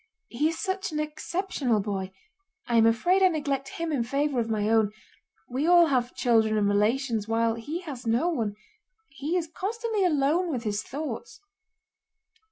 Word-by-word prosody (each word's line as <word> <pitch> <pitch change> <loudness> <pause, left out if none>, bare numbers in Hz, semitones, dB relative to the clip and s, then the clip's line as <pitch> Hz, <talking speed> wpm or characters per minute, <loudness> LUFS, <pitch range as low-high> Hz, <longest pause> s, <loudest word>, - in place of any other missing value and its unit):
"He 295 +6 +1
is 330 - -4
such 385 -1 -2
an 305 - -2
exceptional 305 - -1
boy. 195 -2 -3 0.5
I 235 - +1
am 225 0 +6
afraid 350 +12 +3
I 375 - +7
neglect 285 -5 -2
him 330 -1 -2
in 280 -5 0
favor 275 +2 0
of 230 -1 -1
my 210 -2 0
own: 220 -2 +3 0.6
we 265 +6 -1
all 350 -1 +7
have 255 -5 0
children 220 -3 +3
and 205 -1 +2
relations 220 +2 +1
while 225 0 +1
he 290 +10 -5
has 275 -9 -7
no 235 +9 +2
one. 230 -12 -1 0.5
He 285 +6 -2
is 335 -2 -2
constantly 430 +5 -2
alone 325 +2 +2
with 245 -5 -3
his 210 -1 -1
thoughts." 310 - -6
275 Hz, 170 wpm, -27 LUFS, 225-335 Hz, 0.6 s, I